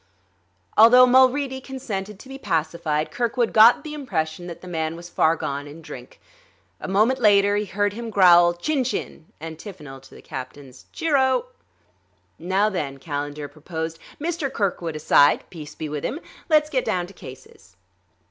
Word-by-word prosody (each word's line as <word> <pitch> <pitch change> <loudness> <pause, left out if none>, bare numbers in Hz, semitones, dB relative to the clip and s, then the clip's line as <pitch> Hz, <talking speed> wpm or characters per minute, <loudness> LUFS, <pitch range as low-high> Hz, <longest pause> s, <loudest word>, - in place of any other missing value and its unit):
Although 245 +3 +8
Mulready 260 +1 +3
consented 210 -7 -6
to 235 - -14
be 270 0 -9
pacified, 160 - -2
Kirkwood 240 0 -1
got 225 +2 +7
the 305 -2 -7
impression 175 - -4
that 170 - -9
the 185 - -11
man 160 -2 -3
was 175 +1 -10
far 160 0 +2
gone 140 -2 -5
in 155 +3 -12
drink. - - -11 0.6
A - - -6
moment 215 +7 +2
later 205 -1 +4
he 210 +1 -1
heard 205 +1 -1
him 230 +1 -6
growl 175 -4 +5
"Chin 270 - -1
chin!" 235 -9 -5
antiphonal 160 -3 -9
to 135 0 -17
the - - -14
captain's 130 0 -9
"Cheer 320 -3 0
o!" 265 - +2 0.9
"Now, 190 +4 +1
then," 150 -9 -3
Calendar 145 0 -5
proposed, 160 +2 -6 0.2
"Mr. 320 -3 -3
Kirkwood 180 - -2
aside 145 -1 +3
peace 155 -4 -10
be 155 - -5
with 150 -1 -5
him! 295 - -3 0.3
let's 305 -1 +3
get 260 -2 0
down 180 -1 -1
to 190 - -14
cases." 130 - -14
185 Hz, 160 wpm, -23 LUFS, 155-250 Hz, 0.9 s, Although